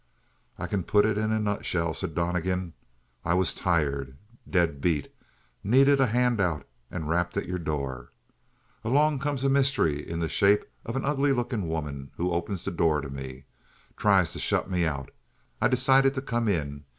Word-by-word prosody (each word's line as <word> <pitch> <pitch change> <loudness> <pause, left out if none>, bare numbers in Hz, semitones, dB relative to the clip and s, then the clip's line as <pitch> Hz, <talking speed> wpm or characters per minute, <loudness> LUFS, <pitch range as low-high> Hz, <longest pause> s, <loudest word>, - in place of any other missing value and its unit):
"I - - -4
can 100 - -1
put 105 +4 +3
it 110 -1 +1
in 110 0 0
a 110 - +1
nutshell," 90 -6 -1
said 80 - -5
Donnegan. 90 0 -1 0.5
"I 85 +1 +1
was 95 -2 +2
tired; 70 -7 -1 0.3
dead 85 -6 +1
beat; 75 -4 0 0.5
needed 135 +6 +5
a 135 - +4
handout, 110 - +1 0.2
and 80 -4 -5
rapped 90 +3 0
at 100 - -1
your 90 0 -3
door. 70 -5 -4 0.7
Along 145 +5 +2
comes 140 -1 -2
a 135 - +3
mystery 130 - +2
in 85 +2 -5
the 85 - 0
shape 100 +4 +3 0.2
of 115 - -3
an 135 - -1
ugly 140 0 +2
looking 120 -7 -2
woman 75 -4 -4
and 90 - 0
opens 85 +2 -2
the - - -2
door 80 -3 +2
to 70 -1 -7
me. 65 -1 -8 0.5
Tries - - +3
to - - -6
shut - - 0
me 90 -2 0
out; 70 -3 -4 0.5
I 115 - +5
decided 135 +2 +4
to 130 - -2
come 120 -3 -1
in. 70 -7 -2
90 Hz, 175 wpm, -27 LUFS, 80-120 Hz, 0.7 s, needed